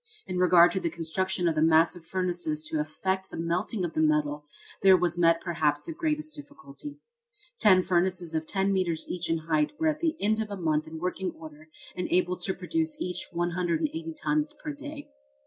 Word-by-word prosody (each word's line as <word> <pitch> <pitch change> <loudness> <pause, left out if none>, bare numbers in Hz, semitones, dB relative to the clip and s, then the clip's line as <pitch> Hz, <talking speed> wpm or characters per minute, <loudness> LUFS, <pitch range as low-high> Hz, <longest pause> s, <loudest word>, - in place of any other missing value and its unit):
In 185 -1 -3
regard 175 -1 +6
to 190 - -1
the 170 - -1
construction 175 +2 -1
of 165 - +2
the 155 - 0
massive 165 +1 +3
furnaces 175 -5 -2
to 155 - -1
effect 190 +5 -2
the - - -8
melting 180 +4 -1
of 165 - -5
the 155 - +1
metal, 150 -1 +1 0.3
there 190 -1 +7
was 175 -1 0
met 165 -1 +4
perhaps 155 -4 0
the 330 - -6
greatest 310 -2 -2
difficulty. 290 - -10 0.6
Ten 185 -3 +6
furnaces 180 -2 0
of 160 0 -2
ten 195 0 +1
metres 175 -4 0
each 175 -2 -3
in 165 - +2
height 155 -2 +1
were 320 -1 +3
at 305 0 -2
the 325 -1 0
end 215 +2 +1
of 215 - -4
a 200 - -5
month 155 -3 0
in 160 0 -7
working 180 +2 -2
order 155 -1 -12 0.3
and 180 - -2
able 180 0 +2
to 185 +1 -1
produce 315 - -2
each 180 - -3
180 180 - -1
tons 300 0 0
per 305 - -5
day. 295 +1 -8
180 Hz, 195 wpm, -28 LUFS, 160-200 Hz, 0.6 s, there